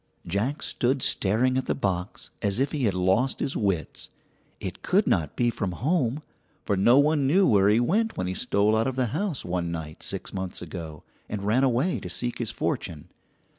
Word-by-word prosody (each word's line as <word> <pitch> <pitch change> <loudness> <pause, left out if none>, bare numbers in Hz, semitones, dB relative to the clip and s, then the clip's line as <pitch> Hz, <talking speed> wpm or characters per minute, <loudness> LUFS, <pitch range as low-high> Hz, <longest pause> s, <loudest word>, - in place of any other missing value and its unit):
Jack 105 - -1
stood 130 +2 0
staring 125 +6 +3
at 130 - -6
the - - 0
box 90 -1 -3
as 100 0 +1
if 135 +3 +1
he 140 -5 -1
had 100 -4 +1
lost 95 +9 +1
his 135 - -2
wits. 95 -6 -2 0.5
It - - -6
could - - +2
not 75 -3 0
be 120 -1 +2
from 95 -5 -3
home, 145 - 0 0.4
for 100 - +1
no 115 +7 +5
one 145 -1 +3
knew 185 +7 +4
where 100 - +4
he 105 +2 +4
went 215 - +1
when 90 - -1
he 90 - -2
stole 105 0 +2
out 110 +2 +1
of 130 - -2
the 130 -1 +1
house 175 -3 -2
one 85 -1 -2
night 80 -2 -6
six - - -4
months 95 -1 -4
ago, 80 -4 -8 0.3
and 105 -2 -4
ran 110 +6 +2
away 135 +7 +1
to 90 - -7
seek 120 +7 -2
his 120 -3 -2
fortune. 75 -3 -3
110 Hz, 200 wpm, -26 LUFS, 95-135 Hz, 0.5 s, no